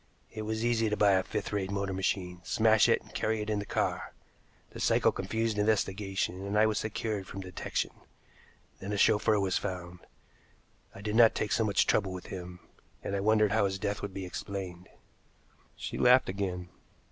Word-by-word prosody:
It 110 - -6
was 110 +1 -2
easy 115 -2 +2
to 105 - -1
buy 100 0 +5
a 95 -1 +4
fifth 105 +2 -4
rate 95 -2 -1
motor 100 -1 -2
machine, 95 -1 -2
smash 110 +2 +4
it, - - +3
and - - -18
carry 110 0 0
it 105 0 -3
in 105 - 0
the 100 - -6
car. - - -1 0.6
The - - -9
cycle - - +3
confused 110 +3 -2
investigation, 95 -3 0
and 100 +1 -1
I 110 - +6
was 110 -1 +1
secure 110 -1 -3
from 95 +1 -7
detection. 90 -1 -3 0.9
Then 100 +2 -4
a - - -1
chauffeur 105 +1 +4
was 95 -1 +1
found. 90 -1 -5 1.0
I 95 - -9
did 105 +1 -2
not 115 -1 +6
take 105 - -2
so 115 - +2
much 100 -3 +2
trouble 95 -3 +1
with 90 - -7
him, 90 -1 -7 0.4
and 100 - -2
I - - 0
wondered 105 0 +3
how 110 -1 +3
his 95 0 -1
death 100 0 -2
would 100 - -4
be 95 0 -5
explained." 90 0 -6 0.9
She - - -5
laughed 125 -2 +5
again. 95 -2 -3
100 Hz, 190 wpm, -30 LUFS, 95-110 Hz, 1.0 s, I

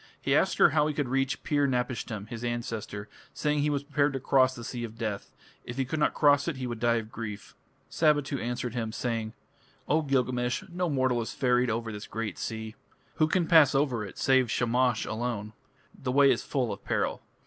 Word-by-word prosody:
He - - 0
asked - - +2
her - - +6
how 150 0 +3
he 150 - -2
could 145 -4 -1
reach 135 +1 0
Pir 145 -1 +2
napishtim, 125 -5 -2
his 115 0 -7
ancestor, 115 -3 -4 0.3
saying 150 -1 0
he 145 +1 +2
was 145 -1 -1
prepared 145 0 +1
to 135 - -2
cross 130 0 +3
the 120 - -8
Sea 120 0 -5
of 115 -1 -7
Death: 110 -4 -4 0.3
if 125 - -7
he 135 - +1
could 155 +5 -3
not 150 - +2
cross 145 0 +4
it 165 - -1
he 130 -1 -4
would 120 -2 -4
die 120 0 +3
of 110 -1 -3
grief. 105 -3 -7 0.3
Sabitu 145 -3 +1
answered 120 0 -3
him, 115 -3 -2
saying: 115 -1 -3 0.5
"O 155 +2 +3
Gilgamesh, 125 -3 0
no 180 0 -1
mortal 130 -4 +1
is 115 - -5
ferried 125 -1 +2
over 115 0 -2
this 105 +1 -7
great 110 -3 -4
sea. 110 -1 -5 0.4
Who 155 - +4
can 175 +1 +1
pass 160 -5 +6
over 135 -6 +1
it 100 - -9
save 130 -3 +3
Shamash 120 0 +1
alone? 110 -2 -3 0.4
The 130 - -4
way 140 +1 +6
is - - +1
full 125 -6 -1
of - - -11
peril. - - -1
125 Hz, 205 wpm, -28 LUFS, 115-140 Hz, 0.5 s, her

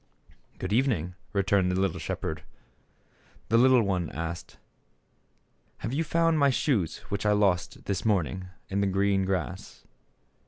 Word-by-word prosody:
"Good 95 +2 -3
evening," 110 - +1 0.2
returned 100 -2 +2
the 90 - 0
little 95 -3 0
shep - - -4
herd. 80 -1 -3 1.1
The 115 - +4
little 130 -1 +6
one 90 -5 -1
asked, 85 +1 -6 1.2
"Have 115 - -4
you 155 +4 +1
found 165 0 +2
my 140 -1 +5
shoes 125 - 0
which 100 - -2
I 105 0 +3
lost, 95 -5 +1
this 100 -2 -2
morning, 95 -3 0 0.2
in 100 +1 -1
the 100 - +2
green 95 0 +2
grass 90 -8 -4
100 Hz, 145 wpm, -28 LUFS, 90-115 Hz, 1.2 s, little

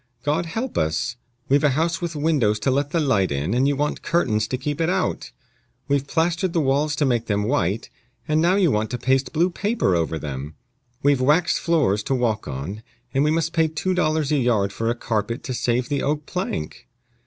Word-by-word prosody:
God 155 +4 0
help 225 +9 -3
us! 80 +9 -1 0.3
we've 140 +2 +3
a 150 - +5
house 170 +3 0
with 170 -2 -3
windows 145 -9 +2
to 135 - +2
let 140 +2 0
the 165 - 0
light 115 - +2
in, 70 +8 -1
and 130 +3 +3
you 145 - +1
want 150 +2 -1
curtains 110 -11 +1
to 130 - -2
keep 145 +4 -3
it 165 - +2
out; 185 0 -1 0.6
we've 140 -1 0
plastered 170 +3 0
the 170 - +2
walls 145 +1 +1
to 145 - +1
make 120 -3 0
them 105 -1 0
white, 110 -4 -1 0.4
and 155 +1 +2
now 175 +3 +3
you 185 -6 +3
want 105 -1 0
to 125 - -3
paste 130 +2 +1
blue 170 +3 +2
paper 200 - 0
over 80 -1 0
them; 70 0 -6 0.5
we've 140 -2 +3
waxed 150 +6 +3
floors 145 - +2
to 135 - -1
walk 115 -4 -1
on, 75 +10 -5 0.3
and 135 - +2
we 150 - +2
must 165 +1 0
pay 165 -1 +3
two 160 +4 -2
dollars 155 -4 +1
a 150 - +3
yard 110 -6 +1
for 115 0 -1
a 120 - 0
carpet 115 0 -2
to 130 - -4
save 120 +1 0
the 140 -1 -1
oak 150 +1 -1
plank! 180 - -4
140 Hz, 210 wpm, -23 LUFS, 110-160 Hz, 0.6 s, a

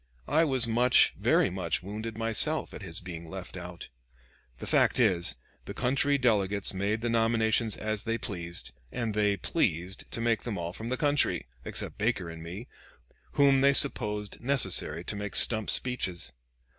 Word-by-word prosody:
I 160 +2 +3
was 130 -5 +5
much, 120 +2 +4
very - - +2
much, 90 -2 -2
wounded 110 +3 -6
myself, 115 +8 +1
at - - -8
his 85 -4 -2
being 85 -2 -8
left 95 0 -8
out. 90 -1 -8 0.7
The - - -8
fact - - +2
is, 90 -8 +3 0.3
the - - -7
country 140 +3 +1
delegates 100 -7 +2
made 100 +3 -1
the 120 - -1
nominations 115 -1 +1
as 110 -1 -3
they 115 0 -1
pleased, 85 -6 -5 0.2
and 115 -3 -3
they 105 -1 +1
pleased 90 +2 -2
to - - -4
make 115 -1 +1
them 115 -5 -4
all 85 0 -4
from 110 +4 -6
the 130 - -1
country, 145 0 +1 0.2
except - - -4
Baker 100 -6 -1
and 80 0 -10
me, 90 +9 -8 0.7
whom 140 -1 +4
they 140 0 +5
supposed 105 -6 +1
necessary 120 - +1
to 105 - -3
make 100 -1 -5
stump 110 -3 +3
speeches. 110 -9 -1
110 Hz, 165 wpm, -28 LUFS, 95-120 Hz, 0.7 s, was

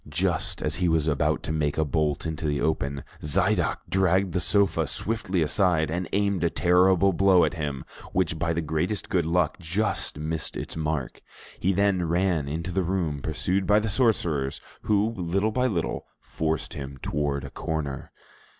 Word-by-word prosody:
Just 85 +2 -1
as - - 0
he 90 -1 +1
was 80 -2 +2
about 75 -3 0
to - - -3
make 75 -2 -1
a 80 - +2
bolt 75 -1 0
into 80 -1 -3
the 75 -1 0
open, 70 -3 -1 0.2
Zidoc 75 -1 +2
dragged 95 -1 +2
the 90 - +1
sofa 100 0 +2
swiftly 100 -6 0
aside, 80 -1 +2
and 90 +1 -3
aimed 100 -3 +1
a 85 - +3
terrible 95 +2 +4
blow 95 -1 +5
at 80 - -2
him, 75 -5 -4 0.3
which 85 -3 0
by 85 - 0
the 85 0 -1
greatest 80 +7 -2
good 85 -4 +1
luck 85 -1 +1
just 95 0 -1
missed 80 +2 -3
its - - -6
mark. 75 -4 -3 0.4
He 95 - +2
then 95 -2 +1
ran 85 -2 +1
out - - -4
into 85 +3 -3
the 95 +2 +1
room, 85 -5 -1
pursued 90 +6 -1
by 105 - +5
the 110 0 0
sorcerers, 90 - +1 0.2
who 105 +1 +1
little 95 +3 0
by 125 +3 +1
little 90 -9 -2
forced 80 -1 -3
him 70 -1 -7
toward 70 -1 -1
a - - -8
corner. 75 -4 -4
85 Hz, 175 wpm, -26 LUFS, 75-95 Hz, 0.4 s, blow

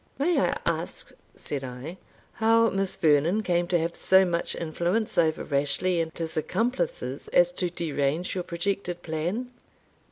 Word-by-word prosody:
"May 330 +5 +2
I - - +1
ask," - - -2 0.2
said 140 -2 -4
I, 130 +7 -7 0.4
"how 230 +1 +4
Miss 195 0 -1
Vernon 160 +7 +3
came 175 -2 +1
to 175 - +2
have 165 +1 -2
so 190 0 +5
much 170 -1 -1
influence 175 +7 -1
over 160 -2 +2
Rashleigh 145 +5 +1
and 160 -1 -5
his 165 -1 -4
accomplices 250 - -2
as - - +4
to 180 - -2
derange 160 0 -1
your 180 - -2
projected 175 0 -3
plan?" 175 +11 -3
175 Hz, 150 wpm, -27 LUFS, 160-210 Hz, 0.4 s, so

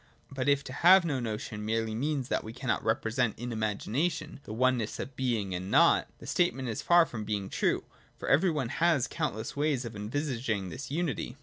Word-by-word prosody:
But 135 0 -1
if 140 0 +3
to 130 - -8
have 180 +4 +6
no 145 -5 0
notion 110 -2 -4
merely 110 0 -1
means 135 +2 -1
that - - -1
we 110 - -8
cannot 125 0 -2
represent 115 +1 0
in 120 +2 -5
imagination 115 - -2
the - - -8
oneness 120 -1 +1
of 135 - -6
Being 115 -7 -1
and 90 +1 -4
Nought, - - +5
the - - -12
statement 135 -8 0
is 110 - -3
far 175 -1 +5
from 110 -8 -6
being 105 -2 -3
true; - - +1 0.3
for - - -7
every 165 +7 +4
one 145 -7 -1
has 165 -5 +2
countless 135 -9 -3
ways 145 -3 0
of 115 -2 -7
envisaging 115 -3 -2
this 125 +11 -7
unity. 145 -4 -2
125 Hz, 195 wpm, -30 LUFS, 110-145 Hz, 0.3 s, have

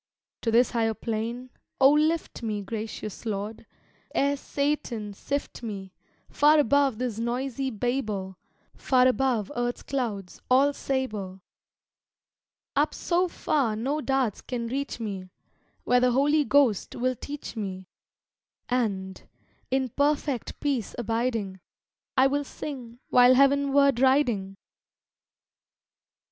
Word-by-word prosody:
To 230 - -1
this 235 +2 +4
higher 225 -2 +1
plain, 235 +3 -4 0.3
O 270 +1 +7
lift 310 +1 +1
me, 210 -3 -3
Gracious 215 0 -6
Lord! 215 0 -4 0.5
ere 280 +1 +2
Satan 270 -7 -2
sift 280 +8 -4
me, 195 -5 -6 0.3
Far 300 +1 +4
above 285 -3 +3
this 240 -3 -3
noisy 255 +3 -2
Babel; 215 -5 -2 0.4
Far 255 -1 +3
above 255 -5 +1
earth's 245 0 -2
clouds, 220 -9 -4
all 275 +3 +5
sable; 215 -10 -3 1.3
Up 290 +2 +2
so 355 +1 +1
far 275 -9 0
no 275 +8 -1
darts 265 -7 0
can 240 -2 -4
reach 270 +2 -3
me, 195 -4 -5 0.5
Where 250 0 +4
the 250 0 +3
Holy 290 +3 +3
Ghost 260 -6 +2
will 255 +1 0
teach 285 +1 -7
me; 190 -4 -5 0.8
And, 200 -7 -1 0.5
in 265 0 0
perfect 285 -1 -1
peace 270 -8 -1
abiding, 225 -4 -1 0.6
I 260 - +6
will 285 +2 +1
sing 255 -5 -7
while 250 +1 +7
heavenward 280 -1 +4
riding! 245 -8 +2
250 Hz, 115 wpm, -27 LUFS, 220-275 Hz, 1.3 s, O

